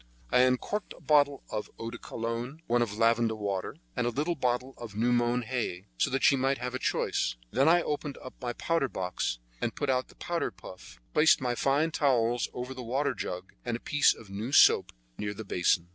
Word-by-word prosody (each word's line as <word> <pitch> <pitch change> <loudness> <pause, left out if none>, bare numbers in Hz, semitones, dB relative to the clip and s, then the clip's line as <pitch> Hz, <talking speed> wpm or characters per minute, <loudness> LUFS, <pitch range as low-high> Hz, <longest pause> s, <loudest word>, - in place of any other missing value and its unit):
I - - +5
uncorked 130 +12 +1
a - - -15
bottle 145 -2 +3
of 105 -1 -3
eau 115 0 -5
de 120 - -8
cologne, 120 +7 -5
one 120 +1 +2
of 105 -3 -1
lavender 115 0 +3
water, 100 -3 -3 0.2
and 120 - 0
a - - +3
little 150 +8 -1
bottle 125 -2 -1
of 115 -4 -8
new 120 +3 +2
mown 120 0 +2
hay, 115 -7 -3
so - - +3
that 135 - -1
she 140 - +6
might 135 +1 +1
have 125 +1 -4
a 130 - -2
choice. - - 0 0.2
Then 135 +6 +4
I 175 +1 +5
opened 145 -1 -3 0.2
my 120 -1 -2
powder 165 0 0
box, 90 - -2 0.2
and - - -1
put 145 -2 0
out 130 0 0
the - - -19
powder 170 -1 -2
puff, 90 -9 -12
placed 160 - +5
my 125 -2 0
fine 140 +6 +1
towels 120 -5 +2
over 125 +1 -5
the 130 - -7
water 135 +4 0
jug, 90 -5 -6
and 120 -1 -2
a - - -19
piece 145 +3 +4
of 105 -4 -14
new 105 +6 -4
soap - - +6 0.3
near 105 0 -3
the 110 - -7
basin. 90 -2 +1
125 Hz, 210 wpm, -29 LUFS, 115-135 Hz, 0.3 s, she